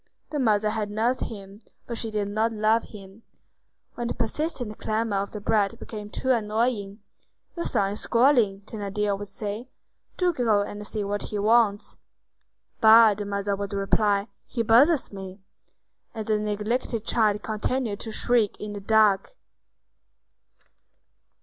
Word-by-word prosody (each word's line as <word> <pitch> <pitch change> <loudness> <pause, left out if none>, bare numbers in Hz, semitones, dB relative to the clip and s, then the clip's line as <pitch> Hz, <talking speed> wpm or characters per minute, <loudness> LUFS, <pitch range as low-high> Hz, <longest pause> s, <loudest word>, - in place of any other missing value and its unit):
The 300 - -2
mother 215 -4 +2
had 215 -1 -2
nursed 225 +5 0
him, 200 -2 -9 0.3
but 235 - -5
she 225 0 -2
did 210 -2 -2
not 215 +3 0
love 220 +1 +2
him. 195 0 -13 0.7
When 240 - -4
the - - -3
persistent 245 -2 -3
clamor 220 -1 -1
of 200 +1 -2
the 210 - -7
brat 205 -1 +1
became 210 -2 -8
too 260 +4 -1
annoying, 215 -2 -1 0.5
"Your 340 - -3
son 200 -4 0
is 210 - -5
squalling," 235 -6 +3
Thénardier 205 -1 -2
would 205 - -6
say; 210 +4 -6 0.5
"do 360 -1 +2
go 225 -7 +2
and 205 0 -7
see 215 -2 -2
what 205 +1 -2
he 210 - -5
wants." 210 -1 +2 0.8
"Bah!" 220 0 +8
the 205 +1 -5
mother 200 0 -1
would 200 0 -5
reply, 200 +1 +1 0.2
"he 235 - -2
bothers 255 +5 +4
me." 190 0 -8 0.8
And 220 -1 -4
the 215 0 +1
neglected 215 +2 -2
child 210 -3 +1
continued 220 0 -2
to 225 - -5
shriek 225 -1 +1
in 210 0 -6
the 205 - -6
dark. 215 - +3
215 Hz, 150 wpm, -25 LUFS, 205-230 Hz, 0.8 s, Bah